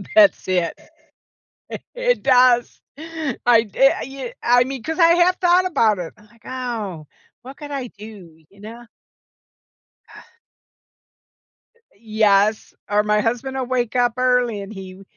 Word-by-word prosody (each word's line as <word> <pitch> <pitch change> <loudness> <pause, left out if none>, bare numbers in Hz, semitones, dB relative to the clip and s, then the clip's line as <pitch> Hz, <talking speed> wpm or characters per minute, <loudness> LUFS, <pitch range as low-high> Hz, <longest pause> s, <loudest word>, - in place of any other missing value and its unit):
That's 310 -9 +4
it. 180 -3 -1 1.2
It - - 0
does. 250 -1 +3 0.2
I 320 -5 -5
y 230 -2 +4
y 270 -1 0
I 245 +1 +4
mean, 265 -2 -6
'cause 320 +2 -5
I 335 0 +6
have 355 +1 +3
thought 360 0 +3
about 225 - +1
it, 170 -2 -6
like, 220 +3 -23
"Oh, 220 - -6 0.4
what 265 +2 -11
can 290 -1 -10
I 265 -3 -4
do?" 195 -8 -14
You 200 0 -21
know? 230 +3 -11 2.9
Eh 465 - -32 0.2
yes, 215 -1 +1 0.2
or 210 0 +2
my 210 0 +1
husband 245 +4 -3
will 260 - -2
wake 245 -2 -2
up 245 -1 +2
early 250 -4 +1
and 200 +2 -9
he 190 0 -11
240 Hz, 135 wpm, -20 LUFS, 210-270 Hz, 2.9 s, I